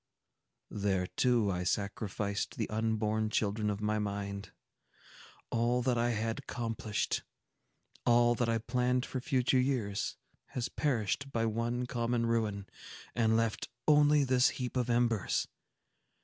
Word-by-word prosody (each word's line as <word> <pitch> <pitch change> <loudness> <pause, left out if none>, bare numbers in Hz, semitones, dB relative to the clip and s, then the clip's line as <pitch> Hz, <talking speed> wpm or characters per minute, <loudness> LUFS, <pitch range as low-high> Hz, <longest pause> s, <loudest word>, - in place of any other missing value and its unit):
There, 100 -3 0
too, 115 0 +2
I 90 -1 -2
sacrificed 100 +2 -2
the 110 - -1
unborn 110 0 0
children 105 0 0
of 105 0 -3
my 105 0 +1
mind. 100 -1 -4 1.0
All 120 +2 +1
that 125 -1 +2
I 120 +1 +2
had 115 +1 -1
accomplished—all 120 0 -1
that 120 0 0
I 115 - +2
planned 125 +2 0
for 130 - -4
future 130 -1 +2
years—has 125 -1 -3
perished 135 0 -1
by 115 -2 0
one 115 +2 -1
common 120 -1 0
ruin, 110 -4 0 0.5
and 110 -2 +3
left 115 -2 -1 0.2
only 150 -1 +5
this 130 -1 +4
heap 125 -1 -4
of 125 -1 0
embers! 120 -4 +1
115 Hz, 120 wpm, -32 LUFS, 105-125 Hz, 1.0 s, only